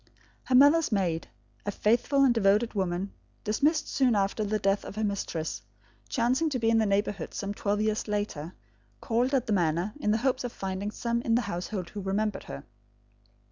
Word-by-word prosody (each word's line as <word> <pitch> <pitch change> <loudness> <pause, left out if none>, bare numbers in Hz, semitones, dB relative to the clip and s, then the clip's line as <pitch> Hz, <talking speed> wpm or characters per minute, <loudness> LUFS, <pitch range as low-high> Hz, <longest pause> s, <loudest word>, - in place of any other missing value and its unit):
Her 260 - +2
mother's 290 +4 +6
maid, 175 -6 0 0.4
a - - -3
faithful 240 +7 +2
and 260 -3 +5
devoted 215 +1 +2
woman, 190 -1 -2 0.3
dismissed 290 +9 +1
soon 255 -4 +2
after 200 +2 0
the 215 +1 0
death 195 -1 +1
of - - -8
her 220 - -2
mistress, 160 - -3 0.5
chancing 255 +6 +1
to 275 - -1
be 225 -1 +2
in 225 - +4
the 220 - +2
neighbourhood 200 +1 -1
some 200 0 -3
twelve 205 0 -1
years 215 0 0
later, 205 -6 -3 0.4
called 245 +2 0
at 255 -2 +1
the 220 - 0
manor, 175 +2 +1
in 210 - -1
the 215 - +3
hope 260 0 +1
of 245 - -3
finding 195 0 -4
some 235 +2 -2
in 230 -1 +1
the 245 - +3
household 185 -2 -4
who 205 - -5
remembered 200 +2 -1
her. 140 - -7
210 Hz, 185 wpm, -28 LUFS, 195-235 Hz, 0.5 s, mother's